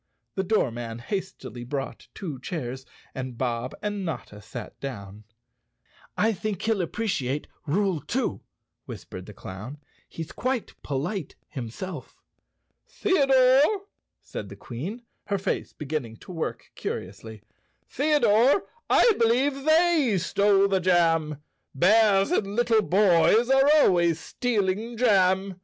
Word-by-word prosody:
The 190 Hz, -, -1 dB
doormen 120 Hz, -, -1 dB
hastily 185 Hz, -, -5 dB
brought 135 Hz, +2 st, -5 dB
two 155 Hz, -9 st, -6 dB
chairs 130 Hz, -4 st, -5 dB, 0.3 s
and 130 Hz, -2 st, -6 dB
Bob 120 Hz, 0 st, -2 dB
and 205 Hz, -1 st, -2 dB
Notta 120 Hz, -, -6 dB
sat 110 Hz, +2 st, -9 dB
down. 105 Hz, -6 st, -7 dB, 0.9 s
"I 220 Hz, +2 st, +3 dB
think 205 Hz, 0 st, -3 dB
he'll 220 Hz, -3 st, +1 dB
appreciate 155 Hz, -, -2 dB, 0.2 s
rule 190 Hz, +2 st, +1 dB
two," -, -, -2 dB, 0.4 s
whispered 95 Hz, 0 st, -9 dB
the 105 Hz, -, -10 dB
clown. 105 Hz, +10 st, -8 dB, 0.3 s
"He's 165 Hz, -1 st, -7 dB
quite 255 Hz, -2 st, -2 dB
polite 150 Hz, +5 st, -3 dB
himself." 140 Hz, +5 st, -7 dB, 0.7 s
"Theodore," 275 Hz, +1 st, +3 dB, 0.4 s
said 100 Hz, -, -7 dB
the 100 Hz, -, -9 dB
Queen, 155 Hz, -, -7 dB, 0.2 s
her 200 Hz, -, 0 dB
face 190 Hz, +1 st, -2 dB
beginning 140 Hz, -6 st, -4 dB
to -, -, -10 dB
work 165 Hz, -3 st, -5 dB
curiously, 100 Hz, +3 st, -6 dB, 0.4 s
"Theodore, 280 Hz, -, +3 dB, 0.3 s
I 475 Hz, -, +6 dB
believe 265 Hz, +4 st, +2 dB
they 315 Hz, -, +4 dB
stole 200 Hz, +2 st, +3 dB
the 195 Hz, -1 st, +1 dB
jam. 165 Hz, -5 st, +2 dB, 0.3 s
Bears 200 Hz, -, +4 dB
and 200 Hz, -, 0 dB
little 235 Hz, -2 st, +3 dB
boys 205 Hz, +5 st, +4 dB
are 270 Hz, +1 st, +5 dB
always 170 Hz, -, +4 dB
stealing 220 Hz, +1 st, -1 dB
jam. 190 Hz, -4 st, +3 dB
185 Hz, 115 wpm, -26 LUFS, 135-225 Hz, 0.9 s, I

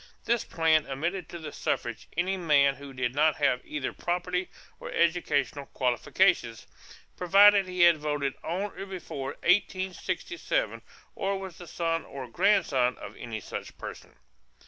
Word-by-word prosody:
This 235 Hz, -1 st, +1 dB
plan 160 Hz, -2 st, +2 dB
admitted 165 Hz, +6 st, -3 dB
to 170 Hz, -, -7 dB
the 155 Hz, -3 st, -7 dB
suffrage 120 Hz, -5 st, -3 dB
any 185 Hz, +3 st, +1 dB
man 150 Hz, -6 st, +4 dB
who 140 Hz, +1 st, -11 dB
did 130 Hz, -2 st, -2 dB
not 150 Hz, +2 st, +3 dB
have 125 Hz, -4 st, +1 dB
either 150 Hz, -3 st, -4 dB
property 180 Hz, +1 st, -2 dB, 0.3 s
or -, -, -7 dB
educational 165 Hz, -4 st, +1 dB
qualifications, 125 Hz, -, +1 dB, 0.5 s
provided 200 Hz, +2 st, +6 dB
he 180 Hz, -1 st, -2 dB
had 170 Hz, -2 st, +7 dB
voted 145 Hz, -2 st, -1 dB
on 190 Hz, +5 st, -2 dB
or 195 Hz, -, -4 dB
before 140 Hz, -8 st, -5 dB
1867 190 Hz, -, 0 dB, 0.3 s
or 195 Hz, 0 st, -1 dB
was 190 Hz, -3 st, -8 dB
the 175 Hz, -, -10 dB
son 165 Hz, 0 st, -1 dB
or 135 Hz, -2 st, -7 dB
grandson 140 Hz, -, +2 dB
of -, -, -9 dB
any 115 Hz, -3 st, -6 dB
such 95 Hz, -, -7 dB
person. -, -, -9 dB
165 Hz, 145 wpm, -28 LUFS, 140-185 Hz, 0.5 s, had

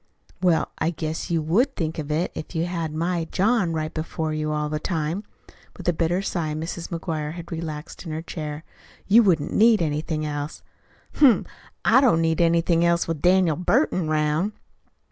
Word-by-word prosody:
"Well, 175 Hz, -3 st, +2 dB
I 160 Hz, -, +1 dB
guess 160 Hz, +1 st, -4 dB
you 165 Hz, -2 st, 0 dB
would 235 Hz, -, +2 dB
think 160 Hz, -1 st, -3 dB
of 150 Hz, -1 st, -5 dB
it 160 Hz, +4 st, 0 dB
if 155 Hz, -, -8 dB
you 165 Hz, +1 st, +1 dB
had 170 Hz, -3 st, -3 dB
my 170 Hz, +2 st, -1 dB
John 195 Hz, +1 st, +1 dB
right 155 Hz, 0 st, -3 dB
before 160 Hz, 0 st, -3 dB
you 155 Hz, 0 st, -2 dB
all 150 Hz, 0 st, -1 dB
the 150 Hz, 0 st, -2 dB
time." 165 Hz, +3 st, -2 dB, 0.5 s
With 185 Hz, -, -8 dB
a 175 Hz, -, +4 dB
bitter 170 Hz, +3 st, 0 dB
sigh 160 Hz, -5 st, -2 dB
Mrs. 165 Hz, +2 st, -5 dB
McGuire 160 Hz, -3 st, -3 dB
had 170 Hz, 0 st, -9 dB
relaxed 160 Hz, -2 st, -6 dB
in 165 Hz, -, -6 dB
her 160 Hz, +1 st, -4 dB
chair. 155 Hz, -2 st, -6 dB, 0.4 s
"You 220 Hz, +4 st, +6 dB
wouldn't 170 Hz, -9 st, +2 dB
need 225 Hz, 0 st, +5 dB
anything 155 Hz, 0 st, -1 dB
else." 145 Hz, 0 st, -5 dB, 0.5 s
"Humph! 265 Hz, -7 st, +5 dB, 0.4 s
I 260 Hz, -, +6 dB
don't 235 Hz, -12 st, +4 dB
need 165 Hz, 0 st, +1 dB
anything 170 Hz, 0 st, +3 dB
else 170 Hz, 0 st, +2 dB
with 165 Hz, -3 st, -3 dB
Daniel 180 Hz, -3 st, +4 dB
Burton 180 Hz, -, +1 dB
'round." 155 Hz, +6 st, +1 dB
165 Hz, 180 wpm, -24 LUFS, 155-180 Hz, 0.5 s, You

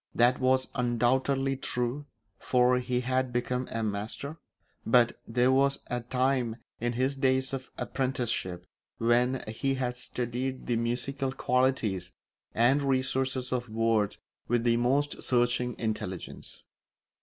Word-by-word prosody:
That 120 Hz, +2 st, +4 dB
was 130 Hz, 0 st, +2 dB
undoubtedly 130 Hz, +2 st, +1 dB
true, 125 Hz, +3 st, -2 dB, 0.3 s
for 125 Hz, 0 st, +3 dB
he 125 Hz, 0 st, -1 dB
had 130 Hz, 0 st, 0 dB
become 125 Hz, +1 st, -1 dB
a 115 Hz, 0 st, -2 dB
master; 110 Hz, +9 st, -3 dB, 0.5 s
but 120 Hz, 0 st, +3 dB
there 125 Hz, +2 st, +3 dB
was 140 Hz, +1 st, +3 dB
a 125 Hz, 0 st, -1 dB
time, 125 Hz, -1 st, 0 dB, 0.2 s
in 120 Hz, +1 st, -1 dB
his 130 Hz, +3 st, 0 dB
days 130 Hz, 0 st, +1 dB
of 135 Hz, 0 st, -5 dB
apprenticeship, 120 Hz, -9 st, -2 dB, 0.3 s
when 120 Hz, +2 st, +2 dB
he 135 Hz, +5 st, -1 dB
had 125 Hz, -2 st, -2 dB
studied 125 Hz, +1 st, -3 dB
the 120 Hz, -, 0 dB
musical 125 Hz, +4 st, -1 dB
qualities 125 Hz, -9 st, 0 dB, 0.4 s
and 125 Hz, +5 st, +4 dB
resources 130 Hz, -1 st, 0 dB
of 120 Hz, -2 st, -2 dB
words 110 Hz, -2 st, +1 dB, 0.3 s
with 120 Hz, 0 st, +1 dB
the 120 Hz, -1 st, +3 dB
most 135 Hz, +5 st, +1 dB
searching 120 Hz, 0 st, +1 dB
intelligence. 105 Hz, -5 st, -5 dB
125 Hz, 125 wpm, -29 LUFS, 120-130 Hz, 0.5 s, That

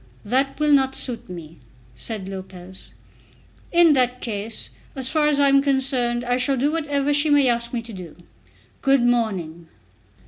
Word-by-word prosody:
"That 265 Hz, +7 st, +1 dB
will 300 Hz, 0 st, +2 dB
not 265 Hz, -2 st, +3 dB
suit 245 Hz, -7 st, -3 dB
me," 165 Hz, -3 st, -10 dB, 0.4 s
said 200 Hz, -, -5 dB
Lopez. 190 Hz, -1 st, -10 dB, 0.8 s
"In 340 Hz, -2 st, +5 dB
that 250 Hz, -2 st, +1 dB
case, 220 Hz, -1 st, -3 dB, 0.2 s
as 265 Hz, -1 st, -2 dB
far 305 Hz, 0 st, +1 dB
as 295 Hz, -1 st, +1 dB
I 285 Hz, -, +5 dB
am 275 Hz, 0 st, +5 dB
concerned, 265 Hz, -3 st, 0 dB
I 245 Hz, 0 st, +1 dB
shall 270 Hz, +1 st, 0 dB
do 280 Hz, +4 st, +1 dB
whatever 290 Hz, -3 st, 0 dB
she 290 Hz, +2 st, +1 dB
may 290 Hz, -2 st, +4 dB
ask 235 Hz, -1 st, 0 dB
me 235 Hz, -2 st, -3 dB
to 230 Hz, -1 st, -9 dB
do. 180 Hz, -5 st, -10 dB, 0.7 s
Good 270 Hz, -2 st, +3 dB
morning." 190 Hz, -9 st, -1 dB
250 Hz, 165 wpm, -22 LUFS, 215-280 Hz, 0.8 s, In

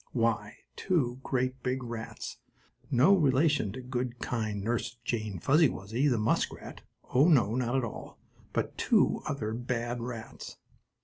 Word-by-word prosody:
Why, 115 Hz, -3 st, 0 dB, 0.2 s
two 130 Hz, -10 st, 0 dB
great 130 Hz, -1 st, -1 dB
big 130 Hz, +1 st, -1 dB
rats, 115 Hz, -2 st, -6 dB, 0.5 s
no 145 Hz, +8 st, +5 dB
relation 145 Hz, -, +3 dB
to 130 Hz, -, -6 dB
good, 125 Hz, -1 st, -3 dB
kind 110 Hz, -5 st, -2 dB
Nurse 120 Hz, +2 st, -1 dB
Jane 110 Hz, -4 st, -2 dB
Fuzzy 145 Hz, -, +4 dB
Wuzzy, 115 Hz, +9 st, -1 dB
the 125 Hz, -4 st, +2 dB
muskrat, 105 Hz, 0 st, -1 dB, 0.3 s
oh, 135 Hz, +5 st, +6 dB
not 125 Hz, -, +3 dB
at 130 Hz, -, +2 dB
all, 115 Hz, -, -7 dB, 0.3 s
but -, -, -2 dB
two -, -, +3 dB
other 110 Hz, -6 st, -2 dB
bad 120 Hz, 0 st, -2 dB
rats! 115 Hz, -2 st, -7 dB
120 Hz, 135 wpm, -30 LUFS, 115-130 Hz, 0.5 s, oh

